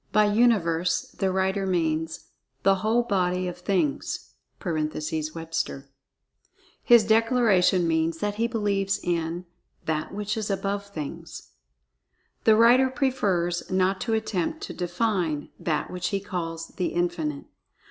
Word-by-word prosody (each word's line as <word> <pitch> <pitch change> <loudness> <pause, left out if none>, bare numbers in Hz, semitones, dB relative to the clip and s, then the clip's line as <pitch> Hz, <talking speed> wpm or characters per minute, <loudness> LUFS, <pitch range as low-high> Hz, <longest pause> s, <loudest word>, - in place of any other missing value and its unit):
By 215 0 +4
"Universe," 180 -7 +2
the 190 -1 +1
writer 190 +1 0
means 160 -2 -1 0.3
"The 195 0 +4
whole 225 +3 +2
body 185 -4 0
of 180 0 -6
Things" 180 -6 -1 0.3
(Webster). 155 -2 -3 0.9
His 235 -2 +6
declaration 220 -5 +3
means 160 0 +1
that 205 +4 -1
he 225 +3 0
believes 200 -4 0
in 170 0 -2 0.4
"That 155 -1 -2
which 210 +1 -3
is 215 -1 -2
above 200 +1 -2
Things." 155 -8 -8 0.9
The 220 - +7
writer 245 +4 +6
prefers 200 -11 0
not 185 +1 +1
to 230 - -1
attempt 220 - -2
to - - -5
"define" 175 -4 -1
THAT 155 -3 -1
which 180 -1 -2
he 200 - -1
calls 165 -4 -5
"The 180 - -2
Infinite." 170 -5 -2
185 Hz, 125 wpm, -26 LUFS, 165-210 Hz, 0.9 s, The